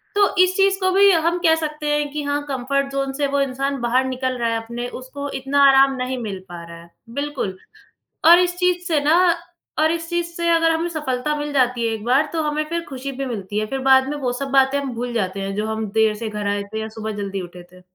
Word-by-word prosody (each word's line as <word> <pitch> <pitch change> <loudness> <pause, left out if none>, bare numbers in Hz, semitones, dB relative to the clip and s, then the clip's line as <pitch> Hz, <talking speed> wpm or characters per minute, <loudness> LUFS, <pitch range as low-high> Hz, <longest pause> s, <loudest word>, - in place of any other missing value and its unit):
तो 405 -1 +3
इस 370 0 0
चीज़ 390 0 +3
को 375 -1 +1
भी 395 +1 +6
हम 335 0 +2
कह 320 -1 +6
सकते 305 -1 -4
हैं 295 -1 -1
कि 300 0 -4
हाँ, 285 0 -1
कम्फ़र्ट 275 +1 -1
ज़ोन 275 0 -1
से 285 +1 0
वो 280 0 0
इंसान 275 +1 -2
बाहर 245 +2 +2
निकल 255 0 -2
रहा 235 -1 +1
है 230 - 0
अपने 235 +2 -5
उसको 280 +2 -7
इतना 280 +1 +2
आराम 270 0 +5
नहीं 255 0 -3
मिल 200 -3 -5
पा 170 -1 -8
रहा 170 0 -10
है, 170 - -17 0.2
बिल्कुल। 275 -7 -4 0.7
और 345 +1 +9
इस 355 0 +1
चीज़ 360 -1 +3
से 315 -3 +2
ना 310 +4 +4 0.6
और 315 +1 +3
इस 330 0 -3
चीज़ 345 0 -1
से 340 0 -1
अगर 330 0 +4
हमें 325 +1 0
सफ़लता 300 -3 -2
मिल 295 0 -4
जाती 250 -3 +2
है 225 - -1
1 220 -1 -6
बार, 265 +5 +3
तो 325 - 0
हमें 300 0 -1
फिर 335 0 -1
खुशी 270 0 -5
भी 270 +1 -4
मिलती 210 -4 -4
है 215 - -1
फिर 270 +4 -3
बाद 265 0 +6
में 295 - -3
वो 260 -4 -1
सब 275 +3 -4
बातें 270 +1 +4
हम 275 -3 -4
भूल 240 +1 -4
जाते 195 -4 -2
हैं 195 0 -4
जो 210 +1 -2
हम 220 0 -2
देर 220 -1 +4
से 220 +1 -5
घर 210 -1 -4
आए 200 0 -1
थे 220 - -2
या 220 - -4
सुबह 220 0 -5
जल्दी 195 -1 -4
उठे 175 0 -10
थे। 180 0 -17
270 Hz, 255 wpm, -21 LUFS, 230-300 Hz, 0.7 s, और